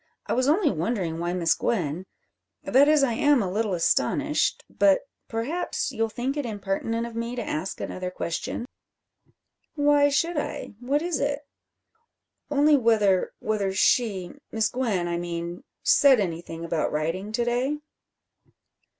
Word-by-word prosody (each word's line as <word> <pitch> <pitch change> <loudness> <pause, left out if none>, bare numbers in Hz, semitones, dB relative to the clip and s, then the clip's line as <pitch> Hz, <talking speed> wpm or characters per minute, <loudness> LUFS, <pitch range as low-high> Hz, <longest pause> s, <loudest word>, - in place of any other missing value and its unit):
I - - -1
was 255 +2 +1
only 325 +1 +3
wondering 175 -2 -2
why 175 +1 -1
Miss 170 -3 +2
Gwen 180 -4 -2 0.6
that 275 +3 +5
is, 300 -2 +5
I 250 -4 +2
am 290 +1 +4
a 185 - -3
little 210 -1 0
astonished 165 - +1
but 200 -1 +3 0.3
perhaps 245 +10 -2
you'll 225 0 -1
think 250 +5 -3
it 290 - -2
impertinent 225 +1 -2
of 235 -1 -8
me 230 +1 -3
to 245 - -3
ask 160 +5 -3
another 185 0 -4
question?" 180 +6 -4 1.1
"Why 290 -1 +4
should 330 +4 0
I? - - -5
What 275 +5 0
is 345 -4 -1
it?" 285 +1 -1 1.1
"Only 295 +1 +4
whether 215 -7 +3
whether 205 -3 -1
she 190 -3 +2 0.2
Miss 220 -1 +1
Gwen, 220 -9 -1
I 170 0 -1
mean 170 0 -5 0.2
said 275 -4 +6
anything 170 -3 -4
about 165 -1 -1
riding 165 +7 -2
to 240 +1 0
day?" 250 +5 0
225 Hz, 145 wpm, -25 LUFS, 180-275 Hz, 1.1 s, said